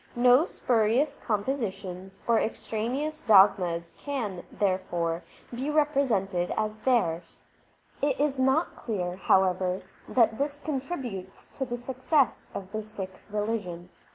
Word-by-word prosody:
No 250 +5 +6
spurious 250 - +1
compositions 195 -5 -3
or 230 -1 +4
extraneous 250 +8 -2
dogmas 190 -5 +4
can, 225 -11 -3
therefore, 175 -4 0 0.3
be 260 +5 -2
represented 260 - +1
as 215 0 -1
theirs. 215 -9 0 0.6
It 280 -2 +1
is 285 -2 +1
not 265 +6 +2
clear, 180 -6 -3
however, 185 -1 +2 0.3
that 225 -2 +3
this 285 +1 -1
contributes 265 - -5
to 265 - -2
the 240 -1 -4
success 260 +3 0
of 190 -1 -6
the 215 0 -2
Sikh 200 -3 -7 0.2
religion. 205 -5 -3
220 Hz, 115 wpm, -28 LUFS, 190-265 Hz, 0.6 s, No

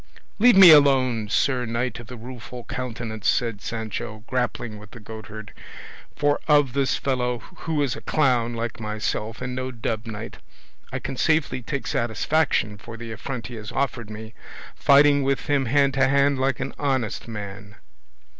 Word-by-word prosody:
"Leave 240 -1 +6
me 190 -3 +11
alone, 130 -7 +5
Sir 125 +3 +1
Knight 115 0 -2
of 120 - -11
the 125 0 -9
Rueful 125 +1 -9
Countenance," 115 -4 -5
said 115 -4 0
Sancho, 110 -1 -5
grappling 120 -4 -2
with 105 0 -13
the 120 - -12
goatherd, 110 -1 -9 0.6
"for 145 0 +1
of 145 -4 +4
this 140 -1 +1
fellow, 125 -2 -1 0.2
who 155 -3 -1
is 135 - -1
a - - -9
clown 125 -5 +1
like 115 0 -4
myself, 110 +1 -3
and 125 0 -4
no 130 0 -3
dubbed 115 -2 -4
knight, 110 0 -7 0.5
I - - -2
can 135 - -5
safely 155 -4 +1
take 140 +4 -4
satisfaction 115 -2 0
for 115 +3 -10
the 115 0 -7
affront 115 +2 -5
he 125 - -7
has 105 -1 -7
offered 125 -5 -2
me, 110 +1 -8 0.4
fighting 145 0 +5
with 135 0 0
him 140 -2 +1
hand 140 +2 +3
to 135 -1 +3
hand 140 0 +3
like 135 0 0
an - - -4
honest 130 -7 -1
man." 105 -2 -8
125 Hz, 165 wpm, -24 LUFS, 110-135 Hz, 0.6 s, me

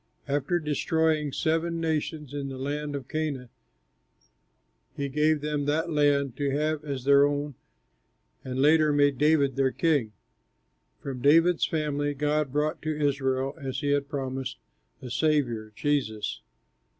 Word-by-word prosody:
After 145 +5 0
destroying 155 -1 0
seven 165 +3 0
nations 155 -3 -2
in 140 -1 -4
the 135 - -6
land 145 +2 -3
of 135 -3 -6
Canaan, 150 -6 -3 1.5
he 140 -1 -2
gave 150 +2 +2
them 150 -1 -2
that 160 +3 0
land 145 -4 +2
to 145 -1 0
have 150 +2 -1
as 140 -4 -4
their 140 +1 +6
own 145 0 0 0.9
and 130 0 -4
later 155 +2 +5
made 145 -2 +2
David 145 -3 +3
their 135 -1 +3
king. 145 -11 +1 0.9
From 130 -3 -5
David's 165 +5 +4
family 145 -2 -1
God 150 0 0
brought 150 +2 -1
to 155 -1 -3
Israel, 135 -1 0
as 135 -1 -4
he 145 - 0
had 140 -1 0
promised, 130 -2 -4 0.5
a 125 - -7
Saviour, 120 -8 0
Jesus. 125 -7 -1
145 Hz, 140 wpm, -27 LUFS, 135-155 Hz, 1.5 s, their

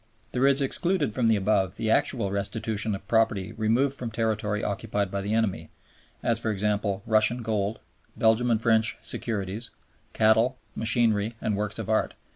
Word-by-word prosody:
There 130 +2 +2
is 140 0 +4
excluded 155 - +1
from 120 -1 +1
the 110 - +4
above 95 -2 0
the 110 -1 -1
actual 110 -4 +1
restitution 105 +1 -2
of 95 - -11
property 110 -3 +1
removed 115 +5 +1
from 125 -3 -5
territory 110 -2 -1
occupied 100 -1 -2
by 100 - -2
the 105 +2 -2
enemy, 95 -8 -1 0.5
as, 115 -1 +1
for 115 - -2
example, 100 -1 -1
Russian 110 +2 +2
gold, 105 -1 -1 0.4
Belgian 115 +2 +3
and 115 -2 +2
French 110 -1 +2
securities, 110 0 -1 0.4
cattle, 115 +4 +3 0.2
machinery, 110 -1 +1
and 105 - -1
works 105 +1 -2
of 110 -3 -5
art. 110 0 0
110 Hz, 160 wpm, -26 LUFS, 105-115 Hz, 0.5 s, is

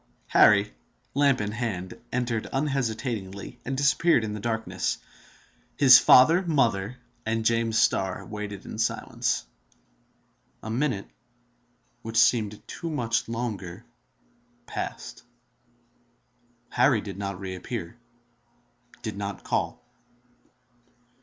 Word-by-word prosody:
Harry, 105 0 +5 0.4
lamp 140 -2 +3
in 105 0 -2
hand, 105 -6 -3 0.2
entered 120 -3 -1
unhesitatingly, 120 -8 -3
and 135 +1 -3
disappeared 140 -1 +3
in 105 -1 -3
the 105 - -5
darkness. 115 +1 -2 0.8
His 130 -3 +9
father, 160 +8 +7
mother, 125 - 0 0.3
and 110 0 -1
James 115 -1 +2
Starr 95 -1 +1
waited 105 -2 -6
in 110 - -7
silence. 110 - -1 1.2
A 110 - -5
minute—which 120 -1 -6
seemed 110 -3 +2
to 170 - -6
them 160 - -3
much 115 -4 -1
longer—passed. 95 - -7 1.5
Harry 125 -3 +3
did 100 -2 -8
not 100 -2 -4
reappear, 95 +1 -6 1.1
did 110 -2 -4
not 100 -1 -5
call. - - -2
115 Hz, 95 wpm, -26 LUFS, 100-125 Hz, 1.5 s, His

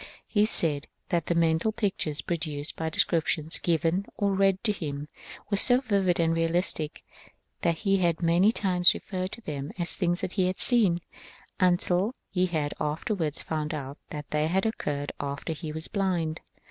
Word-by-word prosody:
He 210 -1 +2
said 150 -8 0 0.2
that 170 -2 0
the 170 - +1
mental 165 +5 +2
pictures 190 -9 -1
produced 155 -4 -2
by 160 0 -2
descriptions 160 0 +1
given 170 +3 0
or 200 -1 +1
read 195 -1 +2
to 225 - +3
him 150 -6 -5 0.4
were 200 - +2
so 245 +4 +6
vivid 195 -8 +2
and 165 0 +3
realistic 165 -1 0 0.6
that 170 -1 +2
he 195 0 +4
had 170 -3 +1
many 175 +5 +4
times 180 -5 +3
referred 185 -1 -4
to 235 - -8
them 145 -7 -5
as 170 -2 +3
things 175 -2 +1
he 185 0 0
had 185 - -2
seen, 200 -9 +3 0.6
until 180 +4 +2 0.2
he 185 -1 +2
had 155 -4 -2
afterwards 155 +1 -2
found 155 0 -3
out 140 -1 -6
that 150 0 -7
they 150 0 +1
occurred 165 -6 -1
after 140 +3 -3
he 155 0 -6
was 160 +1 -3
blind. 175 -6 -1
170 Hz, 160 wpm, -27 LUFS, 155-190 Hz, 0.6 s, so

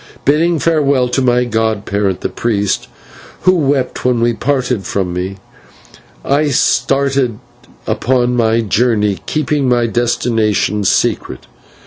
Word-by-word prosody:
Bidding 165 +4 +2
farewell 140 -4 +1
to 135 - 0
my 125 -1 +2
godparent, 105 -4 -1
the - - -2
priest, 105 -4 -1 0.5
who 185 - +4
wept 140 -6 0
when 120 -2 +2
he 120 - +1
parted 125 -3 -1
from 95 -3 -2
me, 95 +2 -4 0.9
I 145 +2 +2
started 135 -1 +1 0.5
upon 125 +2 0
my 115 -1 +2
journey, 105 -3 +1
keeping 150 -3 0
my 120 -1 +2
destination 115 -3 0
secret. - - 0
120 Hz, 115 wpm, -15 LUFS, 110-135 Hz, 0.9 s, who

